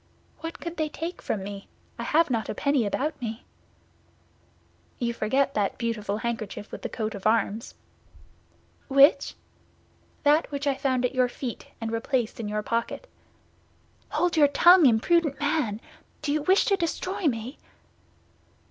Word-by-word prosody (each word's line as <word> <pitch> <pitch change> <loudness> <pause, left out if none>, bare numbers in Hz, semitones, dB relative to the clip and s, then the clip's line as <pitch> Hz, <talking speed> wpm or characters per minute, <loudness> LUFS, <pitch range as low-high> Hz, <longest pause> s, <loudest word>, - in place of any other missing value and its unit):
"What 330 +1 -6
could 340 0 -6
they 310 -1 0
take 330 +4 -6
from 195 - -3
me? 200 0 -7 0.3
I - - -2
have 320 -2 +2
not 225 -2 -1
a - - -3
penny 280 -6 +1
about 295 +7 -2
me." 225 0 -5 1.5
"You 235 -1 -1
forget 265 +5 +1
that 205 -2 0
beautiful 215 -4 -2
handkerchief 220 -2 -4
with - - -7
the - - -4
coat 220 -2 -3
of 200 0 -2
arms." 220 0 0 1.1
"Which?" 275 +2 +5 0.9
"That 300 +2 +4
which 285 0 -4
I 280 - +3
found 260 -2 0
at 250 - -1
your 255 -1 +2
feet, 245 -1 -6
and 225 -1 -4
replaced 230 0 -1
in 220 - -3
your 210 0 -2
pocket." 230 - -2 1.0
"Hold 355 -1 +1
your 300 -2 +6
tongue, 345 +2 +7
imprudent 280 +6 +2
man! 290 -8 0 0.4
Do 290 -1 0
you 305 - +1
wish 375 +6 +4
to 400 - +3
destroy 370 +1 -2
me?" 240 +1 -3
260 Hz, 150 wpm, -26 LUFS, 225-305 Hz, 1.5 s, tongue